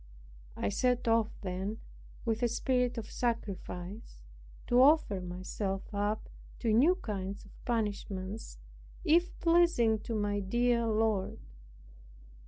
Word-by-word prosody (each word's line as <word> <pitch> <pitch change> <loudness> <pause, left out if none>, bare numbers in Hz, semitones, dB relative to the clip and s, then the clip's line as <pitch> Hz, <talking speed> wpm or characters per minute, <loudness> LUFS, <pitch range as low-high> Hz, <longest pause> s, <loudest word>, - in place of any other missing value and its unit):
I 100 - 0
set 250 - +1
off 225 -1 +4
then 190 +2 -3 0.5
with 225 0 0
a 240 - +4
spirit 250 +1 0
of 220 -2 -5
sacrifice, 200 - -4 0.4
to 245 +1 +4
offer 270 - +5
myself 185 +3 -4
up 205 +1 -1 0.3
to 225 -3 +1
new 295 +11 +5
kinds 200 - -5
of - - -16
punishments, 205 -3 -3 0.5
if 345 +2 +3
pleasing 335 -10 +4
to 225 +2 -4
my 205 -1 0
dear 235 +4 +1
Lord. 215 -3 +1
220 Hz, 115 wpm, -32 LUFS, 200-245 Hz, 0.5 s, offer